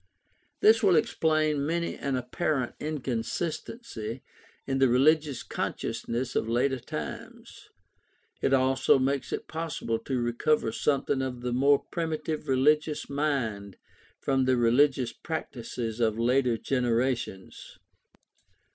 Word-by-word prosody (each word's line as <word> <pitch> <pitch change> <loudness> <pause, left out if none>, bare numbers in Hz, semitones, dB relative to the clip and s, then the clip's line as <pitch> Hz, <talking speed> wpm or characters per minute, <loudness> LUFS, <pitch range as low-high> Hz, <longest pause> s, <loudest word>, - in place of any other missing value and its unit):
This 220 +1 +6
will 190 -4 +5
explain 155 -3 +2
many 170 +3 -1
an 140 -1 -2
apparent 130 +1 -1
inconsistency 135 - -4 0.4
in 135 0 -1
the 135 - +5
religious 145 +2 +3
consciousness 120 +2 -3
of 110 - 0
later 130 +3 +1
times. - - -8 0.7
It - - +1
also 130 0 +4
makes 135 +1 -1
it - - -4
possible 160 -8 -3
to 130 +2 -2
recover 120 +2 +1
something 135 +2 0
of 125 -2 -4
the 125 0 -2
more 140 +3 +3
primitive 160 -2 -3
religious 150 +3 +2
mind 115 -10 -2 0.4
from 135 -1 +1
the 130 -1 +3
religious 125 +2 +3
practices 120 -7 -5
of 110 -2 +1
later 125 0 +2
generations. 120 -5 -2
135 Hz, 110 wpm, -28 LUFS, 120-150 Hz, 0.7 s, This